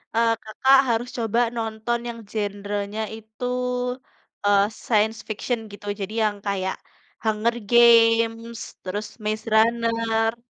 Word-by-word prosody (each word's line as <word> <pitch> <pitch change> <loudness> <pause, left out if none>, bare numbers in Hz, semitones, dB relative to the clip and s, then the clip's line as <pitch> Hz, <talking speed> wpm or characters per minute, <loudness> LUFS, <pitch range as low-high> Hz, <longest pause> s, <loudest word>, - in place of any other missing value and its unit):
eee, 230 0 +4
Kakak 260 +5 +4
harus 235 +1 0
coba 230 0 0 0.2
nonton 225 +1 -2
yang 230 -1 -7
genre-nya 205 0 -3 0.2
itu, 220 +2 -8 1.0
eee, 200 -1 +5 0.2
science 220 0 +2
fiction 220 +3 -2
gitu. 205 0 -11
Jadi 195 +2 -4
yang 210 -1 0
kayak 190 -2 -1 0.5
Hunger 220 +2 +1 0.2
Games, 230 -1 +5 0.2
terus 205 +3 -3 0.2
Maze 215 +1 -2
Runner. 230 0 +2
225 Hz, 115 wpm, -24 LUFS, 210-230 Hz, 1.0 s, eee